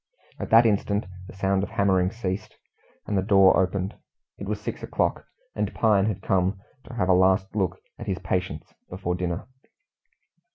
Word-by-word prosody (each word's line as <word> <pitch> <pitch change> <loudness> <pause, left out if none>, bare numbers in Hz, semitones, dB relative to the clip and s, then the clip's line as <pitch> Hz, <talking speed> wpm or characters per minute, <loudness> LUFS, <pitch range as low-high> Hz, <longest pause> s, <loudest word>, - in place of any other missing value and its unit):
At - - -4
that 115 +1 +7
instant 105 -1 +1 0.2
the - - -12
sound 95 0 +1
of 100 - -3
hammering 95 -2 +2
ceased, 105 -1 -5 0.5
and 105 - -2
the 95 - +3
door 95 -1 +5
opened. 95 +2 -1 0.5
It - - -6
was - - -2
six - - -5
o'clock, - - -1 0.3
and - - -2
Pine 105 -3 +3
had 105 -5 -3
come 95 +1 +1 0.3
to 125 - -10
have 90 -6 0
a 95 - +5
last 95 +2 +3
look 95 -3 0 0.2
at 115 - -7
his 95 -2 -1
patients 90 -1 -3 0.2
before 90 -1 -3
dinner. 90 0 -3
95 Hz, 170 wpm, -25 LUFS, 95-105 Hz, 0.5 s, that